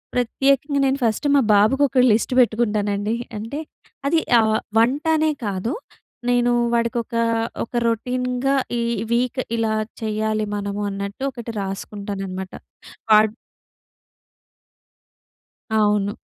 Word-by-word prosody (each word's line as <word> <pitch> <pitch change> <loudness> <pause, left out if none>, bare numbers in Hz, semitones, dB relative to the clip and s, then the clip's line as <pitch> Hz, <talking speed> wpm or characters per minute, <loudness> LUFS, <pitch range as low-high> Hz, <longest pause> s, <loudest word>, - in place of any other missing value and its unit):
ప్రత్యేకంగా 275 +3 +1
నేను 270 0 +1
ఫస్ట్ 225 +6 +1
మా 280 - +5
బాబుకి 220 +8 +4
ఒక 255 - +1
లిస్ట్ 220 +4 +1
పెట్టుకుంటానండి. 210 -2 +1 0.2
అంటే 230 +8 -5 0.5
అది, 325 +3 +3 0.2
ఆహ్, 220 0 +3 0.2
వంటానే 305 +6 +2
కాదు. 200 +6 -2 0.6
నేను 245 0 +3 0.2
వాడికి 235 +1 +1
ఒక, 230 - -9 0.5
ఒక 230 - -11
రొటీన్‌గా 250 +3 0 0.2
ఈ - - 0 0.3
వీక్ 250 +2 +1 0.2
ఇలా 225 -1 0 0.3
చెయ్యాలి 215 0 -1
మనము 200 0 -3
అన్నట్టు 200 +5 -5
ఒకటి 235 -1 -7
రాసుకుంటానన్నమాట. 195 -1 -5 0.6
వాడ్ 215 0 +6 2.5
అవును. 205 -1 +1
225 Hz, 105 wpm, -22 LUFS, 205-250 Hz, 2.5 s, వాడ్